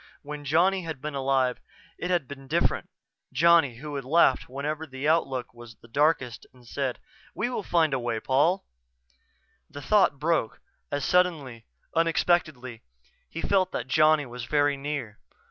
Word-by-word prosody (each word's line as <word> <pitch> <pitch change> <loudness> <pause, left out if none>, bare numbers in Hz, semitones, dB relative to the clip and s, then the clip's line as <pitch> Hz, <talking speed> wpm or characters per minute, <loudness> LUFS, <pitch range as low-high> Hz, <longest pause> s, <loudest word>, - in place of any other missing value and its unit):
When 145 0 -7
Johnny 180 +6 +3
had 160 -5 -6
been 150 +2 -5
alive 135 -2 +1 0.4
it 180 - -3
had 175 -7 0
been 135 -1 -10
different; - - 0 0.4
Johnny, 160 -2 +4
who 145 +5 -8
had 140 -1 -4
laughed 135 -2 +3
whenever 150 +4 -4
the 135 +1 -4
outlook 135 -6 0
was 120 -1 -13
the 115 - -19
darkest 135 -2 0
and 125 -1 -20
said, 135 0 -2 0.4
"_We'll 240 +1 -1
find 165 -5 +2
a 135 - +1
way, 120 -2 -2
Paul 155 - +1 0.4
_" - - -33 0.6
The 145 - -9
thought 200 -5 +3
broke 155 -6 0 0.3
as 145 -1 -1
suddenly, 150 -11 0 0.3
unexpectedly, 155 -7 +1 0.5
he 165 - -6
felt 190 -2 +2
that 125 - -3
Johnny 155 +2 +4
was 125 -1 -7
very 145 +2 +2
near. 140 -6 -5
145 Hz, 155 wpm, -26 LUFS, 130-165 Hz, 0.6 s, Johnny